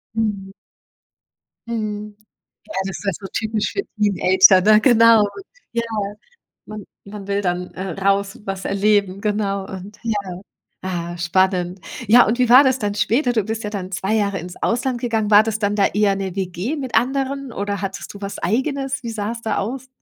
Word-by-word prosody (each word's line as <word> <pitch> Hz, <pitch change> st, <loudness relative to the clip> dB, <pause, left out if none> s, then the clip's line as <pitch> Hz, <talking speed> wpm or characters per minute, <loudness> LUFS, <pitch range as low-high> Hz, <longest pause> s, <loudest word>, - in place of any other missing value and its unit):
Mhm. 205 Hz, -3 st, -2 dB, 1.2 s
Mhm. 210 Hz, -2 st, -4 dB, 0.5 s
Ja, -, -, -10 dB
also, 190 Hz, -, -3 dB
es -, -, -6 dB
ist -, -, -11 dB
ja 195 Hz, -, +2 dB
so 195 Hz, -, -7 dB
typisch 220 Hz, -1 st, -1 dB
für 395 Hz, -, -1 dB, 0.2 s
Teenager, 190 Hz, -2 st, +5 dB
ne? 215 Hz, -, +7 dB
Genau, 230 Hz, -3 st, +6 dB, 0.5 s
ja. 235 Hz, 0 st, -1 dB, 0.8 s
Man 215 Hz, -1 st, -8 dB, 0.2 s
man 200 Hz, -1 st, -9 dB
will 200 Hz, 0 st, 0 dB
dann, 180 Hz, -1 st, -3 dB
äh, 190 Hz, +1 st, -5 dB
raus, 195 Hz, 0 st, 0 dB
was 195 Hz, -1 st, -5 dB
erleben, 200 Hz, -1 st, +1 dB
genau 200 Hz, -2 st, -1 dB
und, 195 Hz, +3 st, -9 dB
ja 225 Hz, -2 st, -1 dB, 0.7 s
ah, 175 Hz, -2 st, -4 dB
spannend. 180 Hz, +1 st, +1 dB, 0.3 s
Ja, 240 Hz, +3 st, +7 dB
und 240 Hz, +4 st, -1 dB
wie 250 Hz, -, +3 dB
war 255 Hz, +4 st, +8 dB
das 265 Hz, -1 st, +2 dB
dann 205 Hz, -2 st, -1 dB
später? 245 Hz, +5 st, +1 dB
Du 220 Hz, -3 st, +1 dB
bist 220 Hz, +2 st, -4 dB
ja -, -, -2 dB
dann 190 Hz, -2 st, -5 dB
2 190 Hz, +3 st, -2 dB
Jahre 200 Hz, -2 st, 0 dB
ins 180 Hz, +1 st, -8 dB
Ausland 240 Hz, +1 st, -1 dB
gegangen. 220 Hz, -3 st, -1 dB
War 205 Hz, +1 st, +9 dB
das 220 Hz, -1 st, -2 dB
dann 205 Hz, -1 st, 0 dB
da 200 Hz, -2 st, +3 dB
eher 205 Hz, -1 st, +1 dB
'ne 190 Hz, -1 st, -4 dB
WG 190 Hz, -, -3 dB
mit 260 Hz, -3 st, -4 dB
anderen 270 Hz, +1 st, 0 dB
oder 200 Hz, -2 st, -3 dB
hattest 195 Hz, 0 st, -5 dB
du 200 Hz, -, -12 dB
was 200 Hz, 0 st, -5 dB
Eigenes? 265 Hz, -, -1 dB
Wie 235 Hz, -, -4 dB
sah 215 Hz, -1 st, -3 dB
es 230 Hz, -1 st, -7 dB
da 220 Hz, -2 st, -2 dB
aus? 255 Hz, +6 st, -4 dB
205 Hz, 185 wpm, -20 LUFS, 195-230 Hz, 1.2 s, War